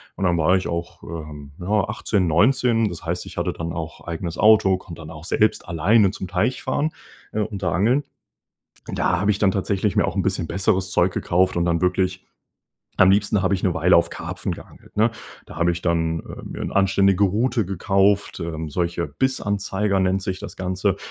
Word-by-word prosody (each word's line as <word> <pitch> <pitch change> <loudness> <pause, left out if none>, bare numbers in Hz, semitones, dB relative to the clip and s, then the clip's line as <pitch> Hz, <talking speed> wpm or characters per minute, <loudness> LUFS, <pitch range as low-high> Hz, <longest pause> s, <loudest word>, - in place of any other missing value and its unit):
und 95 - -5
dann 90 -2 +2
war 85 +3 +3
ich 95 - -1
auch, 85 0 -5
ähm, 75 -3 -8
ja, 90 - -7 0.2
18, 105 -3 0
19. 115 +6 +3
Das 85 -3 -8
heißt, 85 +2 -2
ich - - -10
hatte - - 0
dann 80 0 -5
auch 80 0 -6
eigenes 85 0 -4
Auto, 105 -3 +5
konnte 85 -3 -11
dann 80 - -9
auch 75 0 -10
selbst 110 +1 +1
alleine 95 +5 +3
zum 95 - -6
Teich 105 +7 -1
fahren, 155 +2 0 0.4
äh, 110 - -1
und 105 -2 -4
da 90 - +1
angeln. 120 +11 +2 0.9
Da 90 - +1
habe 100 +3 +2
ich 100 - -2
dann 100 -3 +3
tatsächlich 100 0 -1
mir - - +3
auch - - -3
'n - - +1
bisschen 80 - -1
besseres 95 +1 0
Zeug - - +3
gekauft 95 +1 +1
und 85 - +1
dann 85 0 +1
wirklich 90 0 0 0.7
am 95 - +7
liebsten 100 +1 +2
habe 95 +1 +2
ich 90 - -3
'ne 95 - +2
Weile 90 +1 +4
auf 85 - +2
Karpfen - - -4
geangelt, - - -13
ne? 110 +2 +4 0.4
Da - - -11
habe 85 +1 +2
ich 85 - -5
dann, 80 -1 0
äh, - - -10
mir - - -8
'n - - -3
anständige 100 0 +3
Rute 115 +4 +1
gekauft 100 +2 +1
ähm, 80 -2 -4
solche 85 +1 -1
Bissanzeiger 100 - -1
nennt 95 +1 +1
sich 95 -1 -3
das - - -8
Ganze 95 +1 -1
95 Hz, 200 wpm, -22 LUFS, 85-100 Hz, 0.9 s, am